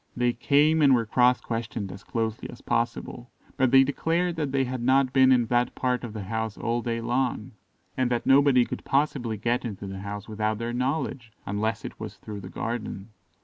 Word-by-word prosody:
They 120 0 +2
came, 150 +6 +3
and 140 -3 +6
were 115 -2 +1
cross 125 +3 +3
questioned 110 -4 -4
as 100 - -10
closely 110 -1 -3
as - - -11
possible, - - -2 0.3
but 130 -1 +2
they 135 +1 +7
declared 165 +5 0
that 150 -4 -2
they 135 0 +2
had 130 -1 -4
not 130 +1 +3
been 130 -1 +6
in 125 -2 +4
that 120 +1 0
part 125 -1 -1
of 115 -3 -6
the 105 -2 -5
house 110 +1 -3
all 120 +1 -1
day 115 -1 -2
long, 120 0 -1 0.4
and 130 -1 +1
that 120 -1 -1
nobody 135 -2 +5
could - - -6
possibly 135 -5 0
get 120 +4 0
into 105 -4 -6
the 95 0 -6
house 100 +1 -6
without 110 0 -1
their 115 +1 -3
knowledge, 125 -2 -2
unless 105 +2 -2
it - - -8
was - - -7
through 105 -1 -8
the 95 - -9
garden. 115 -3 -5
120 Hz, 200 wpm, -26 LUFS, 110-130 Hz, 0.4 s, they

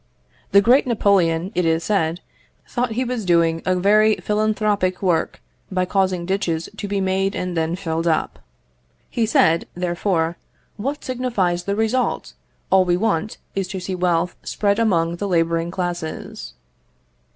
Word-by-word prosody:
The 200 - +7
great 255 +4 +4
Napoleon, 190 -6 +2
it 180 - +1
is 165 0 +1
said, 170 -4 0 0.5
thought 245 -2 -1
he 250 +3 0
was 245 -2 -3
doing 165 -2 +2
a 185 - +3
very 210 +3 +4
philanthropic 210 -3 0
work 175 -4 0 0.3
by 185 -1 +1
causing 185 -2 0
ditches 170 -4 -1
to 205 - -4
be 200 0 -1
made 190 +1 0
and 180 -1 -3
then 165 +1 0
filled 165 -3 -2
up. 160 - 0 0.7
He 230 -2 0
said, 165 -6 +3
therefore, 175 -1 -1 0.4
"What 275 +8 -4
signifies 220 -9 -1
the 200 - -1
result? 225 +4 0 0.4
All 190 -1 +6
we 175 -1 +1
want 215 0 -1 0.2
is 195 -2 -2
to 190 0 -5
see 185 +1 -4
wealth 180 -1 0
spread 205 +1 0
among 170 -6 +1
the 205 - -3
labouring 165 -2 +1
classes." 175 - -5
185 Hz, 150 wpm, -21 LUFS, 170-210 Hz, 0.7 s, The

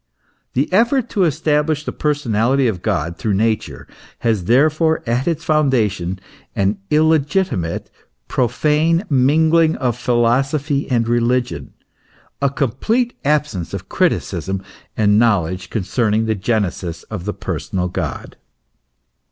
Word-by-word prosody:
The 135 +4 +1
effort 240 +4 +3
to 195 -4 +2
establish 150 0 0
the - - -2
personality 135 -3 +1
of 95 -6 -2
God 85 -6 -2
through 105 -3 -1
Nature, 110 +2 -1 0.3
has 110 -6 0
therefore 155 - +3
at 120 +4 -1
its 165 -1 -1
foundation 115 - +1 0.4
an 100 +1 0
illegitimate, 155 - +1 0.4
profane 155 - +1
mingling 160 +4 +3
of 125 -3 -1
philosophy 135 +5 0
and 115 -3 +1
religion, 120 +1 0 0.7
a 140 - +3
complete 185 - -1
absence 145 - -1
of - - -8
criticism 95 0 -1 0.3
and 105 -1 +4
knowledge 90 -5 +1
concerning 110 +1 0
the 110 - +1
genesis 95 -5 -2
of 100 -5 -7
the 105 - -2
personal 90 -1 -3
God. 85 -7 -5
125 Hz, 115 wpm, -19 LUFS, 105-150 Hz, 0.7 s, and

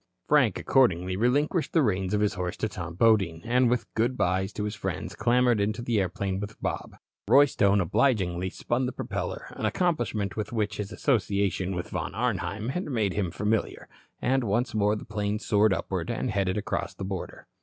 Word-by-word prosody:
Frank, - - +4
accordingly, 90 -8 +2
relinquished 145 - +1
the 160 - +4
reins 95 -3 0
of 105 - +1
his 105 - +2
horse 90 +1 -3
to 110 - -1
Tom 85 -5 -6
Bodine, 95 -6 +3
and 125 +1 +3
with 125 0 0
"good 120 +3 0
byes" 95 +2 +1
to 105 - -3
his 105 0 -2
friends - - -4
clambered 120 -1 +3
into 110 +3 -1
the 120 -3 +1
airplane 95 +1 -2
with 105 +1 -7
Bob. - - -4 0.3
Roy 145 +1 +7
Stone 100 -7 +2
obligingly 95 -3 +1
spun 125 +6 -1
the - - -2
propeller, - - -4
an - - -2
accomplishment 120 - -1
with 105 - -4
which 105 -4 -1
his 105 0 -4
association 100 - 0
with 85 - -5
Von 90 +1 -3
Arnheim 110 -2 -1
had 180 +8 -2
made 110 -9 0
him 95 -4 -1
familiar, 105 +5 -1 0.3
and 130 0 +1
once 120 +4 0
more 105 -1 +2
the 105 - -7
plane 105 -1 -2
soared 105 -1 +2
upward 95 -2 -2
and 120 +1 -1
headed 95 -1 0
across 105 - -3
the 95 - -5
border. 95 -2 -6
105 Hz, 185 wpm, -27 LUFS, 95-120 Hz, 0.3 s, Roy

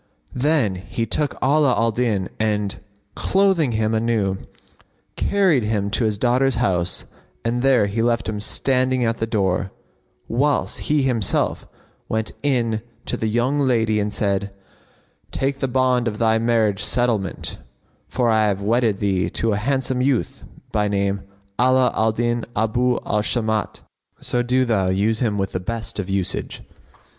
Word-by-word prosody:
Then 125 -8 +1
he 115 +5 -3
took 145 +3 -1
Ala 140 -1 +3
al 115 0 +2
Din 110 -5 0
and, 105 -2 -1 0.3
clothing 190 -9 +2
him 110 0 0
anew, 110 -4 0 0.8
carried 190 -9 +2
him 105 -2 -1
to 115 +2 +1
his 105 -2 0
daughter's 125 +3 +2
house 95 -7 0 0.4
and 120 +1 0
there 130 -5 +4
he 100 +3 -1
left 115 0 +1
him 110 -1 -3
standing 130 +3 +1
at 115 0 0
the 115 - -1
door, 95 -3 0 0.6
whilst 140 +5 0
he 150 -2 +3
himself 120 -7 0 0.4
went 110 0 -1
in 120 -6 0 0.2
to - - -2
the 110 - -2
young 120 +6 +1
lady 115 -5 +2
and 105 0 -1
said, 100 -1 -1 0.8
"Take 135 +1 -2
the 135 - 0
bond 130 -1 +2
of 105 -2 -2
thy 110 0 +2
marriage 110 -4 +1
settlement, 115 -6 0 0.5
for 125 - 0
I 110 -1 +3
have 100 -2 0
wedded 115 -1 +2
thee 95 -4 0
to 115 +3 -1
a 100 - +1
handsome 130 +2 -1
youth 130 -2 0 0.3
by 105 -1 +1
name 100 -1 0 0.4
Ala 130 0 +4
al 110 0 +2
Din 120 +1 -1
Abu 120 +3 +1
al 105 +1 +1
Shamat: 110 -1 -1 0.4
so 120 - -1
do 125 +2 +2
thou 100 -6 +1
use 105 +4 +1
him 110 -4 0
with 95 -1 -1
the 90 - -2
best 110 +3 -5
of 100 -1 -4
usage." 95 -2 -3
115 Hz, 155 wpm, -21 LUFS, 105-125 Hz, 0.8 s, there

